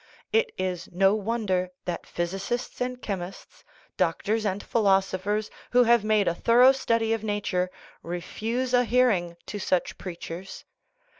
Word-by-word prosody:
It 455 Hz, +1 st, +3 dB
is 185 Hz, -1 st, -3 dB
no 195 Hz, +2 st, +4 dB
wonder 210 Hz, -4 st, -1 dB, 0.2 s
that 175 Hz, -1 st, -4 dB
physicists 195 Hz, +10 st, -3 dB
and 250 Hz, 0 st, -2 dB
chemists, 195 Hz, -4 st, -6 dB, 0.3 s
doctors 215 Hz, +1 st, 0 dB
and 200 Hz, +1 st, -2 dB
philosophers, 200 Hz, 0 st, +1 dB, 0.2 s
who 250 Hz, 0 st, +7 dB
have 235 Hz, -2 st, +4 dB
made 215 Hz, -1 st, +2 dB
a 170 Hz, -, +3 dB
thorough 240 Hz, +8 st, +6 dB
study 230 Hz, -4 st, +1 dB
of 225 Hz, -1 st, -2 dB
nat 205 Hz, -1 st, -2 dB
ure, 180 Hz, -1 st, +1 dB, 0.3 s
refuse 225 Hz, +9 st, -3 dB
a 245 Hz, 0 st, +5 dB
hearing 220 Hz, -9 st, +2 dB
to 205 Hz, -, -5 dB
such 185 Hz, -2 st, -1 dB
preachers. 175 Hz, +1 st, -7 dB
205 Hz, 140 wpm, -26 LUFS, 185-235 Hz, 0.3 s, who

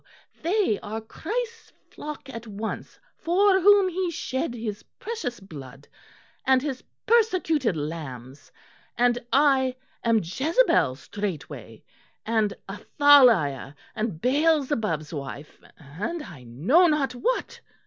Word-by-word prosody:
they 360 Hz, -, +1 dB
are 220 Hz, +1 st, -5 dB
Christ's 455 Hz, -, -5 dB, 0.2 s
flock 300 Hz, -2 st, -8 dB
at 230 Hz, -3 st, -8 dB
once 215 Hz, +1 st, -6 dB, 0.2 s
for 380 Hz, +3 st, +3 dB
whom 400 Hz, +1 st, +6 dB
he 365 Hz, 0 st, -1 dB
shed 260 Hz, -4 st, -3 dB
His 220 Hz, -3 st, -5 dB, 0.2 s
precious 450 Hz, -, -5 dB
blood, 140 Hz, -7 st, -11 dB, 0.6 s
and 265 Hz, -1 st, +4 dB
His 270 Hz, -4 st, -4 dB, 0.2 s
persecuted 355 Hz, -, +2 dB
lambs, 145 Hz, -4 st, -7 dB, 0.5 s
and 245 Hz, 0 st, +3 dB
I 270 Hz, -2 st, +3 dB, 0.3 s
am 230 Hz, -2 st, +3 dB
Jezebel 270 Hz, -, +2 dB
straightway 145 Hz, -, -6 dB, 0.4 s
and 220 Hz, -2 st, +1 dB, 0.2 s
Athaliah 205 Hz, -, +4 dB, 0.2 s
and 215 Hz, -7 st, -3 dB
Beelzebub's 255 Hz, -, +1 dB
wife 140 Hz, 0 st, -8 dB, 0.2 s
and 195 Hz, -, -5 dB
I 145 Hz, -, -12 dB
know 190 Hz, -, +3 dB
not 290 Hz, -5 st, +1 dB
what." 485 Hz, -, -2 dB
240 Hz, 105 wpm, -25 LUFS, -, 0.6 s, whom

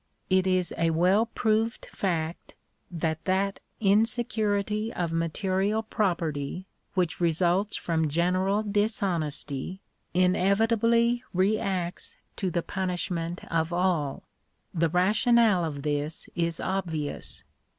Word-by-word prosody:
It 185 Hz, 0 st, +4 dB
is 185 Hz, -2 st, +1 dB
a 165 Hz, 0 st, +3 dB
well 185 Hz, +7 st, +3 dB
proved 225 Hz, 0 st, 0 dB
fact, 170 Hz, -3 st, -3 dB, 0.3 s
that 160 Hz, -2 st, -2 dB
that 195 Hz, +1 st, +1 dB, 0.2 s
insecurity 215 Hz, 0 st, +1 dB
of 175 Hz, -5 st, -2 dB
material 190 Hz, +6 st, 0 dB
property 175 Hz, -6 st, -1 dB, 0.3 s
which 180 Hz, -2 st, 0 dB
results 175 Hz, +4 st, +2 dB
from 160 Hz, -2 st, 0 dB
general 185 Hz, +6 st, +1 dB
dishonesty, 190 Hz, -, -2 dB, 0.4 s
inevitably 225 Hz, +6 st, +3 dB
reacts 190 Hz, -2 st, -1 dB, 0.2 s
to 190 Hz, -, -1 dB
the 170 Hz, -1 st, -1 dB
punishment 180 Hz, -2 st, -3 dB
of 165 Hz, 0 st, +1 dB
all. 175 Hz, -6 st, 0 dB, 0.5 s
The 165 Hz, -1 st, +2 dB
rationale 210 Hz, -, +4 dB
of 145 Hz, -4 st, -4 dB
this 150 Hz, +1 st, -2 dB
is 170 Hz, -1 st, -1 dB
obvious. 165 Hz, -6 st, -3 dB
185 Hz, 100 wpm, -27 LUFS, 165-205 Hz, 0.5 s, It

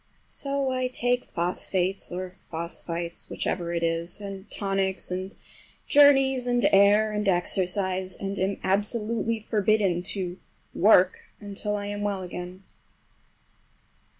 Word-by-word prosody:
So 275 Hz, -1 st, -2 dB
I 255 Hz, 0 st, 0 dB
take 245 Hz, 0 st, 0 dB
phosphates 180 Hz, +2 st, -1 dB
or 180 Hz, +1 st, -4 dB
phosphites—whichever 170 Hz, 0 st, -4 dB
it 170 Hz, -1 st, -1 dB
is, 165 Hz, +2 st, -1 dB
and 200 Hz, 0 st, -8 dB
tonics, 195 Hz, -2 st, -1 dB
and 185 Hz, +2 st, -4 dB, 0.5 s
journeys, 270 Hz, -3 st, +5 dB
and 245 Hz, 0 st, +3 dB
air, 205 Hz, +2 st, +5 dB
and 210 Hz, -1 st, -2 dB
exercise, 185 Hz, +1 st, 0 dB
and 195 Hz, 0 st, -4 dB
am 195 Hz, +2 st, 0 dB
absolutely 220 Hz, +3 st, 0 dB
forbidden 210 Hz, -4 st, +1 dB, 0.2 s
to 180 Hz, -1 st, -4 dB, 0.3 s
"work" 185 Hz, -3 st, +4 dB
until 210 Hz, 0 st, -4 dB
I 205 Hz, 0 st, -3 dB
am 205 Hz, 0 st, -4 dB
well 200 Hz, -2 st, -1 dB
again. 180 Hz, +1 st, -7 dB
195 Hz, 115 wpm, -26 LUFS, 180-215 Hz, 0.5 s, journeys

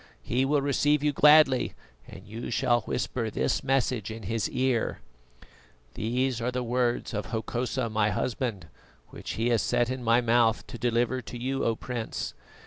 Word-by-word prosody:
He 130 Hz, +3 st, +1 dB
will 145 Hz, 0 st, +1 dB
receive 145 Hz, +1 st, +2 dB
you 150 Hz, -, +3 dB
gladly, 150 Hz, -2 st, +5 dB, 0.3 s
and -, -, -12 dB
you 115 Hz, +3 st, -6 dB
shall 120 Hz, -1 st, +2 dB
whisper 115 Hz, -3 st, -2 dB
this 145 Hz, -, -1 dB
message 130 Hz, -5 st, 0 dB
in 110 Hz, 0 st, -7 dB
his 110 Hz, +3 st, -1 dB
ear: 130 Hz, -2 st, 0 dB, 0.9 s
"'These 125 Hz, +2 st, -1 dB
are 120 Hz, -, 0 dB
the 125 Hz, 0 st, -2 dB
words 120 Hz, 0 st, 0 dB
of 105 Hz, 0 st, -3 dB
Hokosa, 120 Hz, +2 st, -2 dB
my 110 Hz, -1 st, +1 dB
husband, 110 Hz, -2 st, -2 dB, 0.4 s
which -, -, -7 dB
he 115 Hz, +2 st, 0 dB
has 115 Hz, -3 st, +2 dB
set 120 Hz, +4 st, +1 dB
in 130 Hz, -1 st, -4 dB
my 115 Hz, +1 st, +4 dB
mouth 115 Hz, -1 st, +2 dB
to 120 Hz, -, -9 dB
deliver 120 Hz, +1 st, +1 dB
to 120 Hz, -, -8 dB
you, 130 Hz, +3 st, -2 dB
O 115 Hz, -, +1 dB
Prince. 120 Hz, -1 st, -4 dB
120 Hz, 165 wpm, -27 LUFS, 115-130 Hz, 0.9 s, gladly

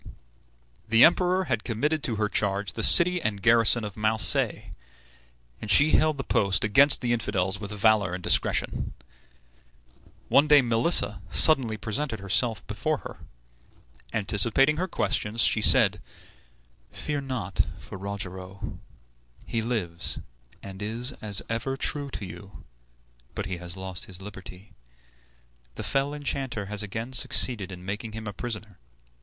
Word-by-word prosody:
The 115 Hz, +1 st, +5 dB
Emperor 180 Hz, +2 st, +3 dB
had 120 Hz, -10 st, -2 dB
committed 145 Hz, +7 st, -2 dB
to 120 Hz, -6 st, -2 dB
her 105 Hz, 0 st, -1 dB
charge 100 Hz, -2 st, -1 dB
the -, -, -5 dB
city 180 Hz, 0 st, +7 dB
and 105 Hz, -7 st, -2 dB
garrison 115 Hz, +1 st, +3 dB
of 105 Hz, -2 st, -7 dB
Marseilles, 110 Hz, +1 st, +2 dB, 0.9 s
and 110 Hz, -, -7 dB
she 145 Hz, +9 st, +5 dB
held 155 Hz, -1 st, +2 dB
the 135 Hz, -, -4 dB
post 100 Hz, -5 st, +1 dB
against 135 Hz, +7 st, +5 dB
the 120 Hz, -1 st, 0 dB
infidels 100 Hz, -4 st, -1 dB
with 100 Hz, -2 st, -7 dB
valor 105 Hz, -3 st, +1 dB
and 90 Hz, -, -9 dB
discretion. -, -, 0 dB, 1.3 s
One 145 Hz, +2 st, +4 dB
day 145 Hz, -2 st, +6 dB
Melissa 120 Hz, +8 st, +2 dB
suddenly 130 Hz, -8 st, +4 dB
presented 110 Hz, +2 st, -4 dB
herself 110 Hz, +2 st, -1 dB
before -, -, -2 dB
her. -, -, -9 dB, 0.9 s
Anticipating 110 Hz, +8 st, +2 dB
her 185 Hz, +3 st, -2 dB
questions, 115 Hz, -, -2 dB
she 100 Hz, -, +2 dB
said, -, -, +4 dB, 0.9 s
"Fear 145 Hz, -2 st, -4 dB
not 125 Hz, -9 st, -2 dB, 0.2 s
for -, -, -11 dB
Rogero; 95 Hz, -1 st, -7 dB, 0.7 s
he 115 Hz, -, -3 dB
lives, 105 Hz, -8 st, -3 dB, 0.5 s
and 95 Hz, 0 st, -10 dB
is 115 Hz, +5 st, -2 dB
as 105 Hz, -2 st, 0 dB
ever 115 Hz, +4 st, -3 dB
true 145 Hz, 0 st, -1 dB
to 105 Hz, -, -7 dB
you; 90 Hz, +2 st, -12 dB, 0.7 s
but -, -, -4 dB
he 95 Hz, -1 st, -5 dB
has 85 Hz, +1 st, -5 dB
lost 95 Hz, -1 st, -3 dB
his 95 Hz, -1 st, -4 dB
liberty. 95 Hz, 0 st, -11 dB, 1.0 s
The -, -, -6 dB
fell 135 Hz, +1 st, 0 dB
enchanter 135 Hz, -7 st, -4 dB
has 105 Hz, +1 st, -2 dB
again 115 Hz, +5 st, -6 dB
succeeded 120 Hz, -5 st, +1 dB
in 90 Hz, 0 st, -10 dB
making 105 Hz, +3 st, -6 dB
him 110 Hz, 0 st, -7 dB
a 105 Hz, -, -6 dB
prisoner. 110 Hz, -4 st, -6 dB
110 Hz, 140 wpm, -25 LUFS, 100-130 Hz, 1.3 s, city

